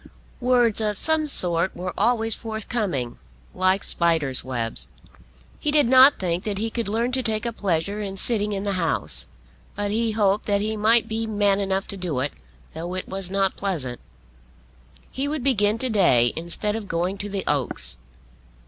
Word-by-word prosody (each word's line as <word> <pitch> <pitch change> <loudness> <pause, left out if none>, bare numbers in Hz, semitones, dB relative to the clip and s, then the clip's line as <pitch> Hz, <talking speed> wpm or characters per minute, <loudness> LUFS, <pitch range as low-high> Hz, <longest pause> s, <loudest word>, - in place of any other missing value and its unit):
Words 245 -3 +3
of 210 -2 0
some 315 +3 +2
sort 175 - +3
were 180 0 -4
always 225 -2 +1
forthcoming, 210 - -3 0.3
like 185 +1 +1
spiders' 160 -6 0
webs. 115 - -3 0.7
He 300 - -1
did 295 -3 +4
not 260 +3 +7
think 175 -1 -2
that 205 -2 -3
he 225 +2 -2
could 230 -2 -3
learn 230 +4 0
to 260 +1 0
take 220 -1 0
a 235 - -2
pleasure 200 0 -1
in 195 -2 -5
sitting 210 0 +2
in 195 -1 -2
the 200 -1 -1
House; 65 - 0 0.5
but 205 0 -2
he 225 +1 0
hoped 205 -1 +1
that 200 -1 +2
he 215 +1 -1
might 220 +2 +3
be 225 +1 -2
man 205 -2 +2
enough 195 0 -1
to 200 - -5
do 175 -8 -2
it, 140 +3 -2 0.4
though 170 +3 -5
it 185 - -4
was 190 -1 -6
not 195 0 0
pleasant. 150 -12 -3 1.1
He 270 +2 -2
would 295 -3 -3
begin 215 -5 +2
to 255 +2 0
day, 125 - +4
instead 170 +6 -3
of 220 -3 -5
going 180 +3 -2
to 205 - -4
the 195 -1 -3
Oaks. 140 - -1
200 Hz, 175 wpm, -23 LUFS, 175-225 Hz, 1.1 s, not